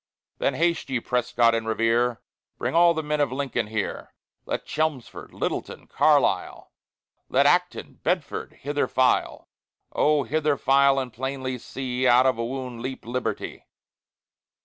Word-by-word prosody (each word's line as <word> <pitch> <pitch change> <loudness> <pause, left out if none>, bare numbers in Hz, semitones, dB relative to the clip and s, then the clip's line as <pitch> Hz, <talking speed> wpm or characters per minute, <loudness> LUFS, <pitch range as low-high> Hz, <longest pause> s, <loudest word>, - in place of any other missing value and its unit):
Then 140 - 0
haste 170 +3 0
ye, 130 -2 0
Prescott 120 -1 +1
and 115 -1 -2
Revere! 115 +2 +1 0.4
Bring - - -2
all 170 0 +5
the 160 - -2
men 150 0 -1
of 140 -3 +1
Lincoln 130 -4 -2
here; 110 -1 -4 0.3
Let - - -3
Chelmsford, 155 -5 -3
Littleton, - - -4
Carlisle, - - +1 0.6
Let - - +3
Acton, - - +1
Bedford, - - -2
hither 145 +1 -1
file 130 -1 +1 0.4
Oh 150 -1 +2
hither 150 +3 0
file, 140 +1 +4
and 130 -3 -3
plainly 130 +1 -4
see 130 +1 -2
Out 125 +1 +6
of 130 -3 +2
a - - 0
wound 125 -1 -5
leap 130 -1 -6
Liberty. 125 +1 -4
130 Hz, 140 wpm, -25 LUFS, 120-140 Hz, 0.6 s, Out